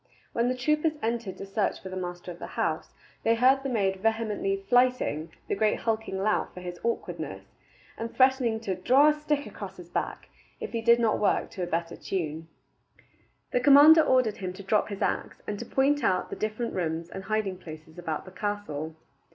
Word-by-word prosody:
When 235 +1 +1
the 255 - +1
troopers 305 +4 +1
entered 225 -4 -2
to - - -6
search 195 +1 -1
for 190 - -8
the 185 - -6
master 180 -1 -5
of 175 - -11
the - - -6
house, - - -1 0.3
they 230 0 +3
heard 260 +3 +4
the 270 - -3
maid 195 -5 +1
vehemently 210 -2 -1
"flyting" 245 -10 +2 0.2
the - - -1
great 215 +1 +1
hulking 220 -3 -1
lout 210 +3 0
for - - -7
his 175 -1 -7
awkwardness, 235 0 -4 0.5
and 230 +1 -4
threatening 260 -4 +3
to 200 -4 -2
"draw 260 +11 +5
a - - +4
stick 300 -1 -1
across 200 -2 -8
his 175 -1 -11
back" - - -3 0.3
if - - -5
he 230 - -2
did 235 +1 +5
not 225 -2 +2
work 205 - +1
to 185 - -6
a 175 - -1
better 170 0 -2
tune. 160 -3 -4 1.0
The - - +2
commander 290 +4 +8
ordered 255 -7 +2
him 185 -2 -4
to 200 +2 -10
drop 210 +3 +1
his 200 -2 -3
axe, - - -2
and 205 -1 -4
to 235 - -6
point 280 +1 +2
out 185 -4 +1
the - - -3
different 215 +2 -3
rooms 165 -2 -2
and 190 0 -7
hiding 205 -2 -1
places 160 -1 -11
about 160 -3 -4
the 185 - -11
castle. 180 -6 -4
210 Hz, 200 wpm, -28 LUFS, 185-245 Hz, 1.0 s, commander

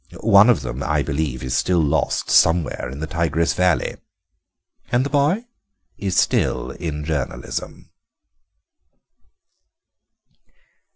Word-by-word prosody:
One 105 +1 +6
of 110 -11 +3
them, 65 0 -5
I 75 0 0
believe, 70 -3 -3
is 65 - -2
still 90 - +1
lost 75 -4 0
somewhere 80 -6 +2
in 70 +3 -8
the - - -2
Tigris 85 0 0
Valley." 90 -2 0 0.9
"And 125 +2 +2
the 140 - -4
boy?" 150 +11 +1 0.5
"Is 95 -2 -3
still - - +1
in 75 -4 -5
journalism." 70 -5 -5
80 Hz, 110 wpm, -21 LUFS, 70-100 Hz, 0.9 s, One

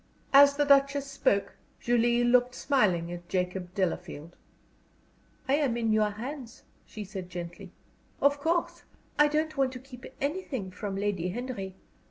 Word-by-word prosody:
As 280 +1 +8
the 290 0 +2
Duchess 280 0 +4
spoke, 200 -7 0 0.2
Julie 240 0 +2
looked 245 +1 +3
smiling 185 -11 +1
at 175 0 -8
Jacob 180 0 -2
Delafield. 175 -4 -3 1.1
"I 265 - +2
am 270 -6 0
in 225 -2 +1
your 215 -1 +3
hands," 240 +3 -8 0.2
she 215 - -7
said, 190 -2 -7
gently. 175 +1 -8 0.5
"Of 285 +1 +3
course 335 +3 -1 0.4
I 295 - +7
don't 310 +1 -1
want 270 -2 +2
to 255 - -7
keep 250 -1 -12
anything 280 - -3
from 195 +1 -5
Lady 195 -3 -1
Henry. 200 -3 -5
235 Hz, 145 wpm, -28 LUFS, 190-275 Hz, 1.1 s, As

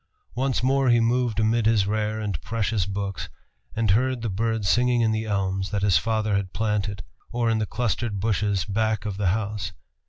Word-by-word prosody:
Once 130 0 0
more 135 0 +3
he 120 0 +5
moved 115 -1 +1
amid 110 0 +2
his 110 -3 +3
rare 110 +1 -1
and 100 -7 -3
precious 110 -4 -1
books, 100 0 -4 0.5
and 110 -3 +2
heard 125 +3 +1
the 115 - -1
birds 110 +1 -1
singing 125 +1 +3
in 110 -1 +3
the 110 0 -1
elms 95 -2 -1
that 100 -1 -2
his 95 -6 +4
father 110 0 0
had 100 -2 -2
planted, 105 -3 -1 0.3
or 120 -1 +1
in 110 - +1
the 110 - -1
clustered 110 -2 -1
bushes 100 -2 0
back 110 0 0
of 100 -2 -3
the 100 -2 0
house. 100 -1 -1
110 Hz, 190 wpm, -25 LUFS, 100-115 Hz, 0.5 s, he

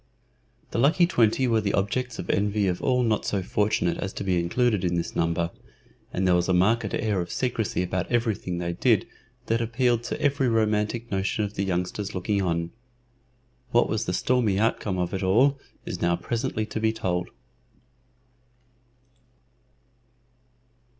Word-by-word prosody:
The - - -1
lucky 155 +7 +4
twenty 125 -5 +2
were 115 -2 +2
the 100 -2 0
objects 115 +5 -1
of - - -6
envy 105 +1 +1
of 90 -2 -1
all 125 -1 +2
not 110 -3 +1
so 100 -2 -1
fortunate 90 -4 0
as 100 - -4
to - - -5
be 90 -2 +1
included 105 +4 +1
in 90 -1 0
this 85 - -3
number, 85 0 0 0.6
and 95 - -1
there 90 - +4
was 90 +1 +1
a 90 - +3
marked 110 +6 +2
air 105 -4 0
of 85 - -6
secrecy 115 -7 -1
about 90 +3 -3
everything 110 -7 0
they 85 0 -2
did - - +2 0.4
that 115 +1 0
appealed 120 +1 +1
to - - -3
every 140 -2 +1
romantic 110 +1 0
notion 100 +2 0
of 100 - -7
the 100 - -2
youngsters 95 +2 -2
looking 100 +2 0
on. 85 -2 -1 1.0
What 120 0 +3
was 110 0 -1
the 90 - -2
stormy 115 -1 +1
outcome 105 -3 0
of 90 -1 -2
it 95 - -2
all 125 +9 +3 0.3
is - - -5
now 85 0 +2
presently 110 +3 -2
to 110 0 -4
be 110 0 +2
told. 90 -5 -2
105 Hz, 165 wpm, -26 LUFS, 90-115 Hz, 1.0 s, lucky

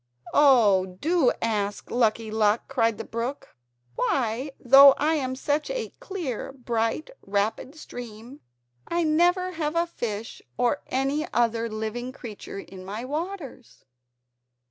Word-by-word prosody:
"Oh, 205 -10 +4
do 325 -5 +3
ask 205 -3 -2
Lucky 225 -2 +1
Luck," 215 0 +2
cried 230 -5 +1
the 225 - -5
brook, 235 +5 -5 0.4
"why, 250 - 0
though 275 +2 +8
I 305 +2 +2
am 260 -4 -1
such 290 - -1
a - - -3
clear, 320 - -5
bright, 240 - -2
rapid 205 +8 -2
stream 245 -2 -10 0.5
I 340 0 0
never 350 +4 +2
have 315 -2 -3
a 335 +1 +2
fish 225 -9 -5 0.2
or 245 +4 +1
any 275 +5 -1
other 230 -1 +1
living 220 +3 -4
creature 220 -6 -9
in 190 -1 -9
my 210 +6 -5
waters." 300 -3 -6
250 Hz, 125 wpm, -26 LUFS, 220-300 Hz, 0.5 s, though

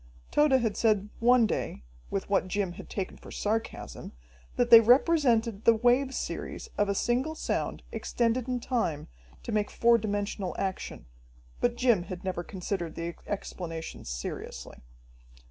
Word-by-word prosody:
Tode 295 -2 +4
had 220 -3 0
said 210 -2 +2
one 245 0 +5
day, 65 - -3 0.3
with 195 - -2
what 195 -2 +1
Jim 190 -1 -1
had - - -10
taken 195 -2 -4
for - - -13
sarcasm, 220 +2 -3 0.4
that 240 -1 +1
they 230 - +13
represented 240 - +3
the 230 - +6
wave 245 +4 +2
series - - -5
of 205 -1 +1
a 200 - +1
single 255 +9 0
sound - - -2
extended 240 +1 0
in 250 -1 -1
time 225 - -2 0.3
to - - -5
make 210 -1 0
four 235 0 +4
dimensional 205 -2 -2
action, 190 - -4 0.5
but 240 -1 +1
Jim 240 -7 +3
had 180 0 -7
never 185 -2 -2
considered 180 -3 -4
the 170 +1 -4
explanation 165 -5 -5
seriously. - - -6
215 Hz, 145 wpm, -29 LUFS, 190-240 Hz, 0.5 s, they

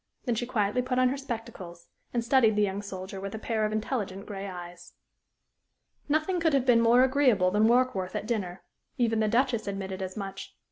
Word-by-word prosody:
Then 245 - +1
she 240 +2 -2
quietly 215 -1 0
put 250 0 -2
on 255 0 +4
her 265 - -1
spectacles 225 -10 -7 0.2
and 235 -1 -1
studied 235 -4 +4
the 210 - +3
young 200 0 -1
soldier 190 -1 -7
with 195 +2 -5
a - - -4
pair 220 0 -1
of 215 - -1
intelligent 210 -3 -3
gray 200 -1 -6
eyes. 175 -2 -9 1.2
Nothing 315 +5 +1
could 325 -2 +2
have 265 -2 +1
been 240 -3 +5
more 235 +2 +5
agreeable 255 -9 +3
than 210 +2 +3
Warkworth 235 -6 +1
at - - -3
dinner. 195 -6 -3 0.3
Even 225 -2 +1
the 215 - +2
Duchess 235 -1 +1
admitted 195 -1 -4
as 185 +1 -5
much. 195 -1 -7
220 Hz, 195 wpm, -28 LUFS, 195-250 Hz, 1.2 s, been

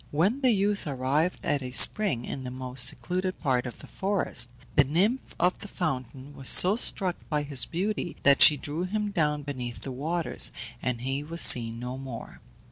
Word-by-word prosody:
When 195 - 0
the 260 - +3
youth 205 -4 0
arrived 140 +6 -2
at 145 -1 -1
a 130 - -6
spring, 130 - +4
in 130 - -6
the 125 - -6
most 130 0 -1
secluded 185 +6 -2
part 130 -4 -1
of 120 - -9
the - - -13
forest, 190 -11 +1 0.2
the 145 - +4
nymph 190 - -1
of 180 +1 0
the 205 - -9
fountain 135 - -5
was 135 -2 -1
so 190 +3 +7
struck 190 -6 +1
by 150 -2 -1
his 140 -3 -1
beauty 185 0 -4
that 140 -1 +4
she 150 -2 +9
drew 145 +4 -6
him 210 +2 -3
down 150 -5 -1
beneath 125 -4 -7
the 135 - -7
waters, 160 +6 -1 0.3
and 125 -2 -3
he 135 +2 -3
was 165 +3 -3
seen 115 -2 +3
no 125 +2 -7
more. 130 -4 -10
145 Hz, 190 wpm, -26 LUFS, 130-185 Hz, 0.3 s, she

